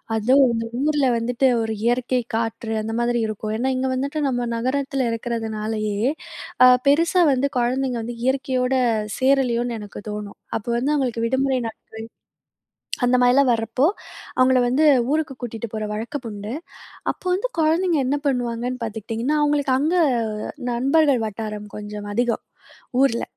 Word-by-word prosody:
அதுவும் 255 Hz, +5 st, +4 dB
இந்த 230 Hz, 0 st, -2 dB
ஊர்ல 295 Hz, 0 st, +2 dB
வந்துட்டு 240 Hz, +3 st, +1 dB
ஒரு 225 Hz, 0 st, -2 dB
இயற்கை, 245 Hz, +2 st, +1 dB
காற்று 225 Hz, 0 st, -2 dB
அந்த 220 Hz, +1 st, -4 dB
மாதிரி 240 Hz, 0 st, +1 dB
இருக்கும். 215 Hz, 0 st, -4 dB
ஏன்னா 250 Hz, +4 st, 0 dB
இங்க 260 Hz, +1 st, -1 dB
வந்துட்டு 280 Hz, +4 st, -2 dB
நம்ம 245 Hz, -2 st, -1 dB
நகரத்தில 265 Hz, +2 st, -1 dB
இருக்கிறதுனாலயே, 220 Hz, -2 st, -3 dB, 0.7 s
அ -, -, +10 dB, 0.2 s
பெருசா 335 Hz, +6 st, +4 dB
வந்து 265 Hz, +2 st, +1 dB
குழந்தைங்க 250 Hz, +1 st, 0 dB
வந்து 240 Hz, +1 st, -5 dB
இயற்கையோட 260 Hz, -1 st, 0 dB, 0.4 s
சேரலயோன்னு 245 Hz, -3 st, +1 dB
எனக்கு 205 Hz, -1 st, -9 dB
தோணும். 210 Hz, -1 st, -6 dB, 0.2 s
அப்போ 225 Hz, -, -7 dB
வந்து 270 Hz, +5 st, +1 dB
அவுங்களுக்கு 245 Hz, -5 st, 0 dB
விடுமுறை 260 Hz, +2 st, +1 dB
நாட்கள் 225 Hz, -1 st, -7 dB, 1.2 s
அந்த 245 Hz, +1 st, +4 dB
மாரிலாம் 250 Hz, +2 st, +5 dB
வரப்போ, 230 Hz, +3 st, 0 dB, 0.5 s
அவுங்கள 255 Hz, 0 st, +5 dB
வந்து 270 Hz, +6 st, +2 dB, 0.3 s
ஊருக்கு 305 Hz, -3 st, 0 dB
கூட்டிட்டு 235 Hz, -1 st, -5 dB
போற 215 Hz, 0 st, -2 dB
வழக்கம் 240 Hz, +5 st, -5 dB
உண்டு. 205 Hz, +1 st, -6 dB, 0.6 s
அப்ப -, -, -26 dB
வந்து 405 Hz, +7 st, -1 dB
குழந்தைங்க 330 Hz, +2 st, +2 dB
என்ன 275 Hz, +3 st, +1 dB
பண்ணுவாங்கன்னு 245 Hz, -1 st, -1 dB
பார்த்துக்டீங்கன்னா, 225 Hz, +5 st, -2 dB
அவுங்களுக்கு 290 Hz, -2 st, +2 dB
அங்க 315 Hz, +6 st, +1 dB, 0.8 s
நண்பர்கள் 275 Hz, +1 st, +3 dB
வட்டாரம் 210 Hz, 0 st, -6 dB
கொஞ்சம் 210 Hz, 0 st, -7 dB
அதிகம், 240 Hz, +1 st, 0 dB, 0.6 s
ஊர்ல. 235 Hz, -4 st, +2 dB
245 Hz, 135 wpm, -22 LUFS, 225-270 Hz, 1.2 s, அ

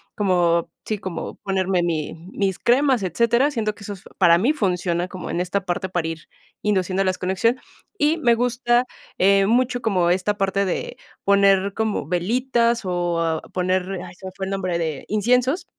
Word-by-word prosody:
como, 175 Hz, -4 st, +2 dB, 0.2 s
sí, 215 Hz, -2 st, -2 dB
como 185 Hz, -4 st, -5 dB
ponerme 190 Hz, -2 st, 0 dB
mi 160 Hz, -3 st, -2 dB, 0.2 s
mis 195 Hz, -2 st, -1 dB
cremas, 260 Hz, -1 st, +3 dB
etcétera. 235 Hz, -, +2 dB
Siento 220 Hz, -6 st, -2 dB
que 205 Hz, -, -14 dB
eso 205 Hz, 0 st, -5 dB
es 190 Hz, -, -13 dB, 0.2 s
para 170 Hz, 0 st, +6 dB
mí 250 Hz, -, +2 dB
funciona 180 Hz, -, -1 dB
como 185 Hz, -1 st, -7 dB
en 175 Hz, -, -2 dB
esta 185 Hz, +2 st, -2 dB
parte 180 Hz, +1 st, -2 dB
para 175 Hz, -3 st, -1 dB
ir 165 Hz, -1 st, -7 dB, 0.3 s
induciendo 195 Hz, -2 st, +1 dB
las 185 Hz, -1 st, 0 dB
conexion 210 Hz, +7 st, 0 dB, 0.4 s
y 310 Hz, -1 st, +2 dB
me 240 Hz, -7 st, +3 dB
gusta 240 Hz, +1 st, +1 dB, 0.3 s
eh, 195 Hz, +1 st, +4 dB
mucho 245 Hz, +2 st, +1 dB
como 185 Hz, -5 st, +1 dB
esta 190 Hz, +3 st, 0 dB
parte 195 Hz, 0 st, +1 dB
de 180 Hz, -, -3 dB, 0.3 s
poner 200 Hz, 0 st, +3 dB
como 220 Hz, -9 st, -2 dB
velitas 235 Hz, +6 st, +1 dB
o 170 Hz, -3 st, -1 dB
poner 185 Hz, 0 st, 0 dB, 0.2 s
ay, 175 Hz, -, -11 dB
se 190 Hz, -, -13 dB
me 185 Hz, -, -6 dB
fue 190 Hz, -, -4 dB
el 195 Hz, -, -5 dB
nombre 185 Hz, -3 st, -1 dB
de 160 Hz, -4 st, -3 dB
inciensos. 250 Hz, -, +1 dB
195 Hz, 175 wpm, -22 LUFS, 180-230 Hz, 0.4 s, para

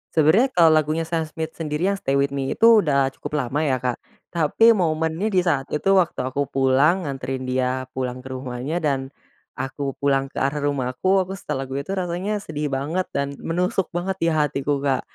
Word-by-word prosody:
Sebenarnya 165 Hz, -, +4 dB
kalau 170 Hz, -2 st, +6 dB
lagunya 155 Hz, +2 st, 0 dB
Sam 165 Hz, -2 st, 0 dB
Smith 160 Hz, +1 st, -6 dB
sendiri 160 Hz, +3 st, -1 dB
yang 200 Hz, -, 0 dB
"Stay 135 Hz, -7 st, -2 dB
with 140 Hz, 0 st, +2 dB
Me" 135 Hz, -1 st, -2 dB
itu 225 Hz, -4 st, +6 dB
udah 140 Hz, -2 st, +2 dB
cukup -, -, -7 dB
lama 145 Hz, +5 st, -1 dB
ya 130 Hz, -4 st, 0 dB
Kak, 125 Hz, -2 st, -1 dB, 0.3 s
tapi 170 Hz, +7 st, +3 dB
momennya 165 Hz, -3 st, +1 dB
di 185 Hz, -, +4 dB
saat 145 Hz, -7 st, 0 dB
itu 150 Hz, +6 st, 0 dB
waktu 170 Hz, -7 st, +1 dB
aku 140 Hz, +2 st, -1 dB
pulang 135 Hz, +7 st, +3 dB
nganterin 135 Hz, -1 st, -4 dB
dia 130 Hz, 0 st, -1 dB
pulang 125 Hz, -1 st, -3 dB
ke 130 Hz, -, -10 dB
rumahnya 130 Hz, +4 st, -4 dB
dan, 135 Hz, -5 st, -1 dB, 0.5 s
aku 135 Hz, +2 st, -5 dB, 0.2 s
pulang 135 Hz, -1 st, +1 dB
ke -, -, -14 dB
arah 140 Hz, +2 st, 0 dB
rumahku, 130 Hz, +5 st, -2 dB, 0.2 s
aku 190 Hz, -, -6 dB
setel 150 Hz, -7 st, -4 dB
lagu 130 Hz, -, -8 dB
itu 140 Hz, -, -15 dB
rasanya 185 Hz, +4 st, -2 dB
sedih 150 Hz, -1 st, -3 dB
banget 165 Hz, +7 st, -2 dB
dan 140 Hz, 0 st, 0 dB, 0.2 s
menusuk 180 Hz, +2 st, 0 dB
banget 190 Hz, +2 st, -2 dB
di 165 Hz, -, +3 dB
hatiku 145 Hz, -2 st, 0 dB
Kak. 135 Hz, -2 st, +1 dB
150 Hz, 190 wpm, -23 LUFS, 135-170 Hz, 0.5 s, kalau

